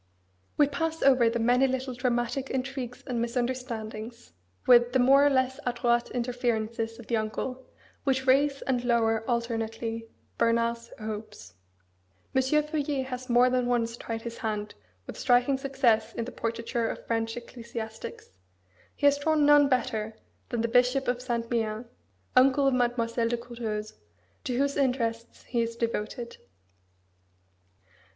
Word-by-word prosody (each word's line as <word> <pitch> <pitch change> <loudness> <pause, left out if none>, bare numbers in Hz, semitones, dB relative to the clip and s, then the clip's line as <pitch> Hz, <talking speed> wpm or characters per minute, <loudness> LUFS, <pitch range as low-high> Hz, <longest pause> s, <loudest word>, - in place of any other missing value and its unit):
We 295 - +6
pass 325 +3 -2
over 255 -4 +5
the 235 - -1
many 245 +3 +3
little 260 0 -2
dramatic 245 +1 -1
intrigues 260 -2 -4
and 245 -4 -2
misunderstandings, 235 - -4 0.3
with 240 -1 +6
the - - +4
more 270 +3 +6
or 290 - +6
less 260 -1 +1
adroit 240 -1 +1
interferences 235 -2 -2
of 235 - -11
the 230 - 0
uncle, 250 +4 -4 0.4
which 265 -2 +1
raise 275 +1 +3
and 250 -2 0
lower 225 -2 +2
alternately 230 -1 -2 0.3
Bernard's 235 0 +1
hopes. 215 - -7 0.8
M. 265 - +4
Feuillet 295 0 0
has 255 0 -6
more 245 +1 +5
than 250 -1 +1
once 230 -1 0
tried 225 -1 -5
his 235 0 -6
hand 210 -3 -3 0.3
with - - -8
striking 250 +2 +3
success 240 -5 +1
in 230 - -2
the 255 - -7
portraiture 230 0 -2
of - - -6
French 225 0 -1
ecclesiastics. 230 - -8 0.6
He - - -2
has 285 0 +5
drawn 305 0 +2
none 290 -1 +7
better 220 -4 -1 0.3
than 240 -2 -1
the 230 - +1
Bishop 250 +3 +3
of 245 0 0
Saint 235 -2 -2
Méen, 225 0 -1 0.5
uncle 270 +2 +5
of 270 - +3
Mademoiselle 235 -2 +1
de 240 - 0
Courteheuse, 225 -3 -5 0.5
to 250 -3 -1
whose 280 +1 +1
interests 235 -4 -1
he 240 -2 -1
is 230 0 -2
devoted. 235 +1 -3
240 Hz, 145 wpm, -28 LUFS, 230-260 Hz, 0.8 s, none